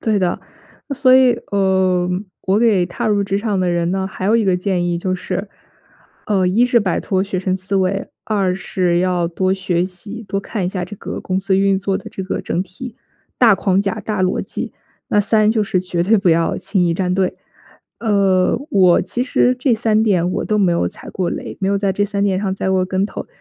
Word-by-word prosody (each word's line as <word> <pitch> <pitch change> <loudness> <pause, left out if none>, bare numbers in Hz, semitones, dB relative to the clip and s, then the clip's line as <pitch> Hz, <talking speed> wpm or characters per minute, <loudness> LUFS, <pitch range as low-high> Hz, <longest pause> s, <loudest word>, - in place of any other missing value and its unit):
对 215 -2 +1
的， 180 -2 0 0.6
所 260 -2 +5
以， 260 -1 +6 0.2
呃， 190 -2 +2 0.4
我 190 +2 +3
给 215 -6 +3
踏 180 - -4
入 205 -2 +2
职 195 0 -1
场 205 -2 -1
的 185 -1 +1
人 170 0 0
呢 190 0 -1
还 190 - -7
有 215 +3 +4
一 225 - +1
个 185 -2 +2
建 180 -1 -1
议 175 -1 -1
就 185 +1 -1
是， 185 +2 -4 0.8
呃， 195 -3 +2
一 205 +7 +3
是 245 -1 +4
摆 185 -4 0
脱 190 -1 0
学 195 -1 -3
生 185 0 -1
思 190 +1 -5
维， 190 +1 0 0.2
二 195 -4 0
是 180 -2 0
要 180 -1 +1
多 185 +2 0
学 180 -2 -1
习， 200 +5 -5
多 195 - -1
看 200 -1 -4
一 180 - 0
下 185 -1 -4
这 180 +4 -6
个 - - -6
公 185 0 -2
司 190 0 +1
运 195 0 +2
作 195 0 -1
的 195 - -10
这 190 - -6
个 190 - -3
整 180 - -2
体 215 +6 -10 0.4
大 230 -4 +6
框 190 0 +1
架、 195 -2 -1
大 210 -3 -1
逻 185 0 +1
辑， - - -5 0.4
那 205 - +3
三 215 +1 +3
就 220 -1 +1
是 185 -2 0
绝 180 -2 -2
对 210 +4 +3
不 195 - +1
要 165 0 +1
轻 190 -3 0
易 170 - +2
站 180 0 -1
队。 190 -1 0 0.6
呃， 195 -3 +2
我 185 -3 +5
其 235 +7 -2
实 255 -1 +2
这 250 -1 +1
三 220 -1 +1
点 185 -6 +2
我 - - -2
都 215 - 0
没 190 -3 +3
有 170 - +1
踩 205 - -12
过 185 -2 -2
雷， - - -6
没 190 - 0
有 200 - +1
在 195 -1 0
这 205 +2 0
三 200 0 -2
点 195 -2 +1
上 190 -1 -1
栽 190 - -2
过 185 -1 +2
跟 190 +2 0
头， - - -7
190 Hz, 245 characters per minute, -18 LUFS, 185-205 Hz, 0.8 s, 以